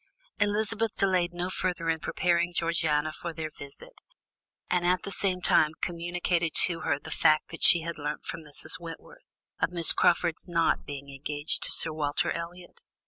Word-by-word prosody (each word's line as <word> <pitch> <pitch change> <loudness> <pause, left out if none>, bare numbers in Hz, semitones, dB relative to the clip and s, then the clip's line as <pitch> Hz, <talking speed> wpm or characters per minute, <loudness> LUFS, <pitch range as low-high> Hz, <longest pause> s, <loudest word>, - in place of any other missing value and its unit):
Elizabeth 215 +2 0
delayed 185 -3 +2
no 175 +1 -4
further 180 -3 -3
in 160 -1 0
preparing 175 +1 0
Georgiana 160 -3 0
for 170 +1 -6
their 160 -1 -5
visit, 150 - -9 0.7
and 180 -1 0
at 180 +1 +1
same 185 -2 0
time 155 0 +4
communicated 175 -1 -2
to 170 -2 +6
her 145 -3 -1
the - - -11
fact 155 0 +2
which 165 - -9
she 170 - +8
had 170 -1 -6
learnt 150 +1 -5
from - - -5
Mrs. 150 +2 -5
Wentworth, 175 - -11 0.4
of - - +2
Miss 170 -2 +7
Crawford's 170 0 +1
not 165 -2 0
being 140 -1 -7
engaged 145 +2 -2
to - - 0
Sir 160 - 0
Walter 155 +3 -1
Elliot. 175 +1 -8
170 Hz, 165 wpm, -27 LUFS, 155-180 Hz, 0.7 s, she